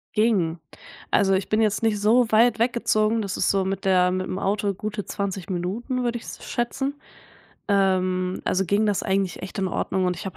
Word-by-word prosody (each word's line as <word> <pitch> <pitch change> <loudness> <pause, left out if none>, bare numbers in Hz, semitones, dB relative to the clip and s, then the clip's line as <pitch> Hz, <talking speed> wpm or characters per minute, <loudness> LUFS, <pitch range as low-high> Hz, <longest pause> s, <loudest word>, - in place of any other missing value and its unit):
Ging. 195 -7 +2 0.5
Also, 195 -1 +3
ich 190 0 0
bin 215 - +2
jetzt 210 0 +1
nicht 215 -2 +1
so 225 +2 +3
weit 230 +2 +4
weggezogen. 225 -2 +1
Das 195 -2 -3
ist - - +2
so 195 -1 +1
mit 195 0 -3
der 180 -1 +4
mit’m 185 0 -3
Auto 200 0 0
gute 210 +2 -5
20 195 -2 -4
Minuten, 220 +9 -2
würde 240 0 -1
ich 230 - -11
s - - -9
schätzen. 270 +4 -2 0.7
Ähm, 185 -2 +1
also, 190 +1 +1
ging 200 +4 +2
das 205 -2 0
eigentlich 190 -2 -1
echt 190 +1 -8
in 190 - 0
Ordnung. 190 0 -1
Und 180 -1 0
ich 175 - -7
habe 190 - -6
200 Hz, 195 wpm, -24 LUFS, 185-220 Hz, 0.7 s, weit